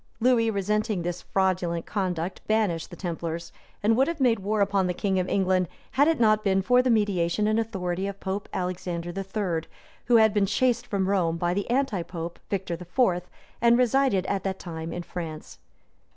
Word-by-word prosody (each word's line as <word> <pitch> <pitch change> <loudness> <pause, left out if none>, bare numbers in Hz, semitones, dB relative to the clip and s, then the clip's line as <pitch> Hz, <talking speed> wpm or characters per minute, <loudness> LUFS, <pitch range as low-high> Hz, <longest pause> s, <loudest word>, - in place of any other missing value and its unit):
} - - -37
Lewis, 235 -1 +3
resenting 210 -1 0
this 175 +1 -3
fraudulent 180 -3 0
conduct, 185 -3 -2
banished 210 -7 +1
the - - -9
templars, 170 -2 -4 0.3
and 220 +2 +4
would 265 +3 +3
have 335 -2 -3
made 240 -5 +3
war 210 +3 -1
upon 200 -2 +2
the 180 - -2
king 190 -1 0
of 185 - -1
England, 185 -2 +2 0.2
had 285 +3 +4
it 325 -4 +2
not 215 -2 +4
been 195 -1 +2
for 250 +4 +5
the 255 - 0
mediation 205 -3 +2
and 215 +1 +2
authority 190 -4 -2
of 200 0 -6
Pope 195 +1 -4
Alexander 175 -1 -3
III., 190 -4 -2 0.4
who 240 - +4
had 220 -2 +6
been 205 -2 +2
chased 245 +2 +1
from 195 -4 0
Rome 175 -4 +1
by 175 +1 0
the 200 +3 -2
antipope, 180 -10 -2
Victor 190 -3 -2
IV., 180 +1 0 0.3
and 235 0 +5
resided 250 -5 +2
at 195 - -1
that 190 -1 -2
time 165 -2 -6
in 175 +1 -4
France. 160 -3 -7
195 Hz, 185 wpm, -26 LUFS, 175-220 Hz, 0.4 s, had